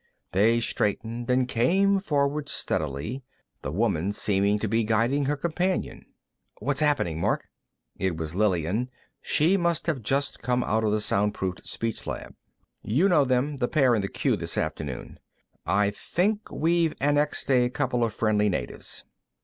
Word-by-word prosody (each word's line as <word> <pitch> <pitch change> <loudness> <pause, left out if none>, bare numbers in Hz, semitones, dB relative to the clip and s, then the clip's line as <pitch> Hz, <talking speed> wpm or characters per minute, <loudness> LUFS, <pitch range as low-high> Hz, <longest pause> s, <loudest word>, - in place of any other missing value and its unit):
They 110 +5 +4
straightened 115 +2 -2
and 125 0 +3
came 190 +12 +3
forward 145 -4 0
steadily, 75 - -2 0.4
the - - -4
woman 100 -1 0
seeming 100 0 +2
to 110 - -2
be 115 +2 +1
guiding 115 +6 +1
her 145 +2 0
companion. 175 +5 -2 0.5
"What's 135 +5 -1
happening, 145 - +1
Mark?" - - 0 0.5
It 95 -4 -1
was 80 -1 -4
Lillian; 100 +4 +1 0.3
she 170 +6 +3
must 170 -2 0
have 155 -7 -1
just 135 +6 -1
come 125 0 +1
out 110 +1 0
of 105 - +2
the 105 0 +1
soundproof 100 -3 -1
speech 115 -1 -3
lab. - - -5 0.5
"You 140 - +2
know 150 -6 +4
them; 130 +3 0
the 125 -2 0
pair 135 -4 +3
in 110 - +2
the 95 - -2
queue, - - 0
this - - -5
afternoon. 70 -5 -4 0.5
I 100 +1 +2
think 205 - -1
we've 165 0 +1
annexed 145 0 +1
a 125 -1 +4
couple 125 -2 0
of 115 - +1
friendly 105 -1 +1
natives." 90 - -4
120 Hz, 155 wpm, -26 LUFS, 105-145 Hz, 0.5 s, They